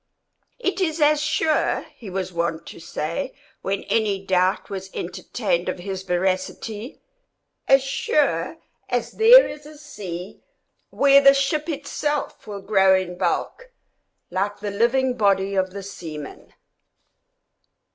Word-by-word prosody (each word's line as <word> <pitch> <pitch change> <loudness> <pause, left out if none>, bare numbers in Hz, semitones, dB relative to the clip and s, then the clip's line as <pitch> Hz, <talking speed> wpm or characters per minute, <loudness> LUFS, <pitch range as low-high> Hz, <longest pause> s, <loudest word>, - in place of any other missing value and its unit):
"It 390 -5 -2
is 325 -3 0
as 300 0 +4
sure," 305 +1 +1
he 220 - -10
was 185 0 -4
wont 170 -1 -2
to - - -11
say, 170 - -4 0.3
when 195 0 -2
any 205 -3 0
doubt 185 0 +1
was 190 -1 -6
entertained 180 0 -2
of - - -3
his 190 +1 -5
veracity, 190 - -2 0.7
"as 270 0 +5
sure 270 - 0 0.3
as - - -1
there 485 +3 +8
is 295 0 -9
a 305 0 -13
sea 185 - -8 0.5
where 280 0 +5
the 275 0 +7
ship 300 +3 0
itself 295 0 -3
will 200 -2 -6
grow 195 -1 +4
in 185 -1 -2
bulk - - -2 0.6
like 200 +3 -2
the 205 0 -4
living 245 +4 +1
body 200 -2 +2
of 190 -1 +1
the 200 +1 -8
seaman." 160 -6 -9
200 Hz, 130 wpm, -23 LUFS, 185-280 Hz, 0.7 s, there